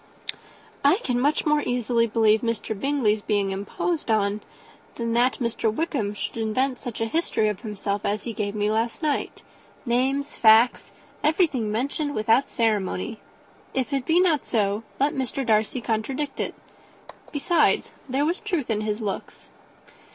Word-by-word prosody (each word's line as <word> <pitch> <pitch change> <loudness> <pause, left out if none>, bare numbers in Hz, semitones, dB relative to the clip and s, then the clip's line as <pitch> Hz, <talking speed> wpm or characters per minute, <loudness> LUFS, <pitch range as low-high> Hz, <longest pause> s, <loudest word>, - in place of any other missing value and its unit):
"I 285 +5 +6
can 245 -2 0
much 290 +4 +1
more 300 -1 +3
easily 240 -2 +1
believe 220 -1 +3
Mr. 230 -2 -2
Bingley's 235 -5 +1
being 205 -2 0
imposed 235 - -3
on 210 -1 +1 0.5
than 230 -1 -2
that 245 +2 +3
Mr. 235 -2 0
Wickham 225 -6 -2
should 205 - -5
invent 250 +4 0
such 240 -4 -6
a - - +2
history 225 -4 +1
of 210 - -3
himself 205 -2 -3
as 205 +1 -1
he 235 - -4
gave 210 -2 -3
me 210 0 +1
last 225 +7 -1
night; 300 -2 -1 0.4
names, 265 +4 0
facts, 225 +2 +5 0.3
everything 295 - +2
mentioned 285 +6 -2
without 225 +5 +3
ceremony. 215 -1 -1 0.6
If 265 +2 -1
it 270 -2 -1
be 330 +2 +4
not 335 -6 +3
so, 205 -2 0 0.2
let 280 +2 +2
Mr. 265 0 -2
Darcy 220 +2 +1
contradict 255 +6 -2
it. - - -2 0.8
Besides, 310 +2 +2 0.2
there 270 +3 +1
was 340 +4 0
truth 350 - -2
in 215 -1 0
his 215 +1 -2
looks." 200 -3 -5
235 Hz, 150 wpm, -25 LUFS, 215-280 Hz, 0.8 s, I